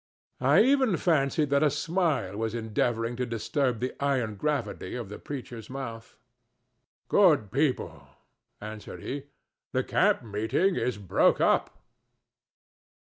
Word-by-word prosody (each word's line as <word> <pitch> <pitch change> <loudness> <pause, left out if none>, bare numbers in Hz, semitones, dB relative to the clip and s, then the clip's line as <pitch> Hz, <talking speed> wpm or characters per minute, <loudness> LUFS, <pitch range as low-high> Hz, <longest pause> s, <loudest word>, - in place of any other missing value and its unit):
I - - +5
even 260 -7 +3
fancied 150 -3 +1
that 140 0 +3
a 155 - +4
smile 150 - 0
was 110 +1 -2
endeavoring 115 +1 -1
to 125 - -1
disturb 120 +2 -1
the 125 +1 -2
iron 130 -6 +1
gravity 115 -5 -3
of 120 -5 -5
the 105 - -8
preacher's 125 -5 -7
mouth. 115 -4 -7 0.9
"Good 150 - +4
people," 135 +2 -1 0.5
answered 105 0 -8
he, 140 +1 -5 0.5
"the - - +1
camp - - +2
meeting 110 - 0
is 125 - -1
broke 100 -3 +2
up." - - +1
125 Hz, 125 wpm, -28 LUFS, 110-150 Hz, 0.9 s, I